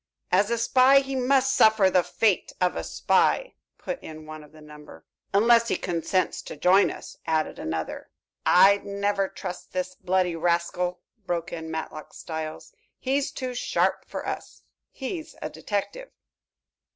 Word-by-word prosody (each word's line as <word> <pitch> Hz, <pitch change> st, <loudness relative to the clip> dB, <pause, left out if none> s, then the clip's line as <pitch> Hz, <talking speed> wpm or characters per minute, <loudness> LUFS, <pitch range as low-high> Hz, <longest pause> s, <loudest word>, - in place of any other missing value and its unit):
"As 200 Hz, +4 st, +3 dB
a 235 Hz, -, +1 dB
spy, 255 Hz, +4 st, +5 dB
he 270 Hz, 0 st, -5 dB
must 265 Hz, +1 st, +2 dB
suffer 220 Hz, -6 st, +5 dB
the 180 Hz, -, +4 dB
fate 205 Hz, +2 st, 0 dB
of 180 Hz, -1 st, +1 dB
a -, -, -3 dB
spy," -, -, +1 dB, 0.2 s
put -, -, -5 dB
in 155 Hz, 0 st, -10 dB
one 155 Hz, 0 st, -9 dB
of 150 Hz, -, -17 dB
the 155 Hz, -, -16 dB
number. 150 Hz, 0 st, -14 dB, 0.3 s
"Unless 230 Hz, +3 st, +5 dB
he -, -, 0 dB
consents 175 Hz, +1 st, -1 dB
to -, -, -9 dB
join 185 Hz, +6 st, +5 dB
us," -, -, -9 dB
added 160 Hz, -1 st, 0 dB
another. 80 Hz, 0 st, -4 dB, 0.3 s
"I'd 195 Hz, +2 st, +6 dB
never 200 Hz, 0 st, -1 dB
trust 180 Hz, -2 st, -8 dB
this 185 Hz, 0 st, -2 dB
bloody 180 Hz, -1 st, 0 dB
rascal," 175 Hz, +1 st, -1 dB, 0.3 s
broke 170 Hz, -1 st, -2 dB
in 160 Hz, -1 st, -6 dB
Matlock 160 Hz, -1 st, -6 dB
Styles. 160 Hz, -2 st, -6 dB, 0.2 s
"He's 270 Hz, +1 st, 0 dB
too 255 Hz, -1 st, -5 dB
sharp 245 Hz, -, 0 dB
for -, -, -5 dB
us. -, -, -6 dB, 0.3 s
He's 315 Hz, +4 st, -6 dB
a -, -, -5 dB
detective." 360 Hz, -, -4 dB
185 Hz, 150 wpm, -26 LUFS, 165-235 Hz, 0.3 s, I'd